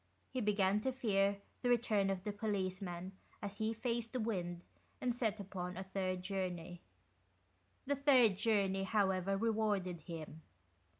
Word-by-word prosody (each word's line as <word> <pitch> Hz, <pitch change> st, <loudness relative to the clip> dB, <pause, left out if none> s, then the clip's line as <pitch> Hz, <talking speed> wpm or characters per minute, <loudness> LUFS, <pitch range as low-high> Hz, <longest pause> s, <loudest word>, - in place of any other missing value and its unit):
He 255 Hz, -, -1 dB
began 205 Hz, -1 st, +3 dB
to 265 Hz, -, 0 dB
fear 200 Hz, -6 st, +2 dB, 0.2 s
the 245 Hz, -, +1 dB
return 220 Hz, -5 st, +3 dB
of 190 Hz, -1 st, -1 dB
the 210 Hz, -, -1 dB
policeman 190 Hz, -3 st, -2 dB, 0.3 s
as 205 Hz, 0 st, -6 dB
he 220 Hz, 0 st, +1 dB
faced 230 Hz, +1 st, -2 dB
the 255 Hz, -, 0 dB
wind 180 Hz, -6 st, -2 dB, 0.4 s
and 250 Hz, -1 st, +1 dB
set 220 Hz, -3 st, 0 dB
upon 180 Hz, -2 st, -5 dB
a 190 Hz, -, -3 dB
third 185 Hz, -1 st, -2 dB
journey. 180 Hz, -3 st, -3 dB, 1.0 s
The 285 Hz, +1 st, +1 dB
third 260 Hz, -7 st, +6 dB
journey, 195 Hz, -2 st, +2 dB
however, 195 Hz, -1 st, +2 dB
rewarded 210 Hz, -5 st, +1 dB
him. 160 Hz, -1 st, -7 dB
200 Hz, 140 wpm, -37 LUFS, 185-220 Hz, 1.0 s, third